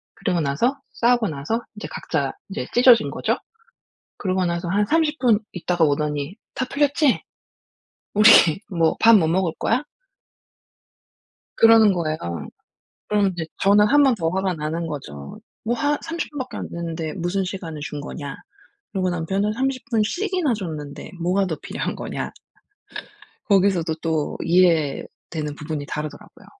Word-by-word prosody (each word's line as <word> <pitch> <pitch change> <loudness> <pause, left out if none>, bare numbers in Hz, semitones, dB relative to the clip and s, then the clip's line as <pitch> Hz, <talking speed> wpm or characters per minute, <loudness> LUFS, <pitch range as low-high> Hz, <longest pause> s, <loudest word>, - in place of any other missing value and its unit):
그러고 180 -3 -1
나서 200 - 0
싸우고 240 -1 +2
나서 155 +11 -2
이제 210 - -7
각자 140 -4 -2 0.2
이제 200 - -4
찢어진 245 -2 +6
거죠. - - -1 0.8
그러고 185 -1 0
나서 170 0 -2
한 205 +3 +1
30 310 +3 +1
분 230 -5 +4
있다가 175 -1 0
오더니 150 +2 -1 0.2
"다 255 - -1
풀렸지? 285 -1 +2 0.9
우리 215 +2 +7 0.4
뭐 165 -3 +2
밥 230 0 +8
뭐 160 -5 +2
먹을 180 0 +1
거야?" 250 +6 +1 1.7
그러는 225 -2 +7
거예요. 155 -3 -1 0.9
그러면 205 -2 +2
이제 170 -2 -5 0.2
저는 205 +1 +5
1 290 +6 +5
번 270 -3 +4
더 165 -4 -1
화가 190 +1 0
나는 160 +2 -3
거죠. 75 - -8 0.2
"뭐 235 +2 0
화 290 +4 0
30 335 -1 -4
분 295 - -8
밖에 260 0 -5
안 - - -5
됐는데 165 -2 -4
무슨 185 +2 -1
시간을 170 -5 -6
준 150 -1 -5
거냐." 145 -1 -6 0.6
그러고 185 -2 0
남편은 190 +5 -1
"30 260 +2 -1
분씩이나 330 - 0
줬는데 155 -8 -6
뭐가 185 +3 +1
더 160 - -2
필요한 - - -4
거냐?" - - -5 1.2
거기서도 185 -5 +3
또 160 -3 -1
이해되는 160 -3 +1
부분이 150 -1 -5
다르더라고요. 150 0 -7
185 Hz, 280 characters per minute, -22 LUFS, 160-225 Hz, 1.7 s, 밥